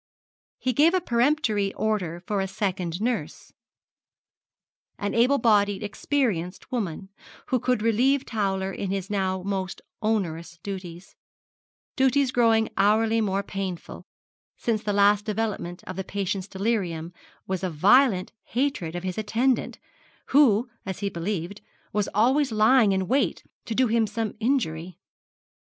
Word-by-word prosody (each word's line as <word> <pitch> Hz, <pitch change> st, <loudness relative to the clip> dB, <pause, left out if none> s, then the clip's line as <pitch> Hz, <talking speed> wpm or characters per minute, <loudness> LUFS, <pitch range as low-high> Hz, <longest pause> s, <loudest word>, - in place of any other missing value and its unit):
He 255 Hz, -, -1 dB
gave 315 Hz, +8 st, +4 dB
a -, -, +3 dB
peremptory 235 Hz, -, +1 dB
order 185 Hz, -5 st, -2 dB
for 205 Hz, -2 st, -1 dB
a 195 Hz, -, -1 dB
second 185 Hz, -3 st, -3 dB
nurse, 240 Hz, +1 st, -3 dB, 1.4 s
an 205 Hz, -, -2 dB
able 250 Hz, +5 st, +4 dB
bodied 205 Hz, -4 st, +2 dB
experienced 205 Hz, -, -2 dB
woman, 190 Hz, -6 st, -3 dB, 0.4 s
who 255 Hz, -, +2 dB
could 250 Hz, -2 st, 0 dB
relieve 255 Hz, +5 st, +2 dB
Towler 195 Hz, -3 st, -1 dB
in 195 Hz, -, -4 dB
his 195 Hz, +1 st, -3 dB
now 190 Hz, -2 st, -1 dB
most 190 Hz, -1 st, -3 dB, 0.2 s
onerous 170 Hz, -6 st, -2 dB
duties 185 Hz, -3 st, -7 dB, 0.8 s
duties 265 Hz, 0 st, +3 dB
growing 225 Hz, -3 st, +3 dB
hourly 220 Hz, +3 st, +3 dB
more 200 Hz, -1 st, 0 dB
painful, 190 Hz, -3 st, -6 dB, 0.5 s
since 225 Hz, -3 st, -1 dB
the 210 Hz, -, -2 dB
last 205 Hz, 0 st, +4 dB
development 210 Hz, -5 st, -3 dB
of 185 Hz, -, -7 dB
the 190 Hz, -, -2 dB
patient's 195 Hz, 0 st, -3 dB
delirium 190 Hz, -6 st, -2 dB, 0.3 s
was 190 Hz, -1 st, -3 dB
a 185 Hz, -, 0 dB
violent 195 Hz, -, +4 dB
hatred 245 Hz, -, -2 dB
of 175 Hz, -, -4 dB
his 185 Hz, +2 st, -3 dB
attendant, 235 Hz, +4 st, 0 dB, 0.5 s
who, 255 Hz, -5 st, +5 dB, 0.2 s
as 190 Hz, +1 st, -6 dB
he 200 Hz, -, 0 dB
believed, 180 Hz, +2 st, -4 dB, 0.3 s
was 210 Hz, -2 st, 0 dB
always 260 Hz, +5 st, +3 dB
lying 220 Hz, 0 st, +5 dB
in 190 Hz, -1 st, 0 dB
wait 270 Hz, +3 st, +1 dB, 0.2 s
to 225 Hz, -, -3 dB
do 260 Hz, -, +4 dB
him 230 Hz, -1 st, +2 dB
some 215 Hz, 0 st, -3 dB
injury. 185 Hz, -, -1 dB
205 Hz, 135 wpm, -25 LUFS, 190-235 Hz, 1.4 s, who